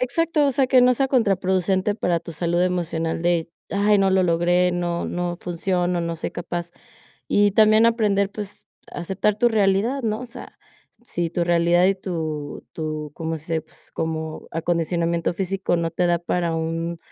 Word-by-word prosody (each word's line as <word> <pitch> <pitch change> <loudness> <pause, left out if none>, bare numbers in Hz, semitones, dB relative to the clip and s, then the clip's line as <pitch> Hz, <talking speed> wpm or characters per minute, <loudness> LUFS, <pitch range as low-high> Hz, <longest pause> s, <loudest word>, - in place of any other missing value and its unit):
Exacto. 300 +4 +1
O - - +3
sea, 265 0 +2
que 255 -1 +5
no 250 0 +5
sea 270 +2 +1
contraproducente 190 -4 +1
para 175 -5 0
tu 170 - -9
salud 175 +2 0
emocional 165 -2 -1
de: 170 -1 +1 0.2
"Ay, 205 +1 +3
no 195 -1 +3
lo 190 0 +3
logré. 175 +1 +2
No, 175 -1 -2
no 175 0 -3
funciono, 180 0 -1
no 170 0 -3
soy - - -4
capaz", 175 0 -5 0.6
y 205 0 +3
también 215 +2 +5
aprender, 205 -4 +2
pues 205 -1 -8 0.2
aceptar 195 +4 -1
tu 240 +2 +4
realidad, 220 +5 +1
¿no?, 215 -1 -1
o 250 - -6
sea, 235 - -12 0.4
si 175 -8 -3
tu 175 -1 0
realidad 175 +1 +3
y 195 - +3
tu 160 -6 -5
tu 155 -2 -5
¿cómo 165 0 -3
se 165 +2 -4
dice?, 160 - +1
pues 160 - -12
como 160 -1 -4
acondicionamiento 170 0 0
físico 190 -1 -1
no 165 -1 -1
te 175 +1 +1
da 175 0 +2
para 170 -1 -1
un 165 +1 -3
175 Hz, 175 wpm, -23 LUFS, 170-205 Hz, 0.6 s, que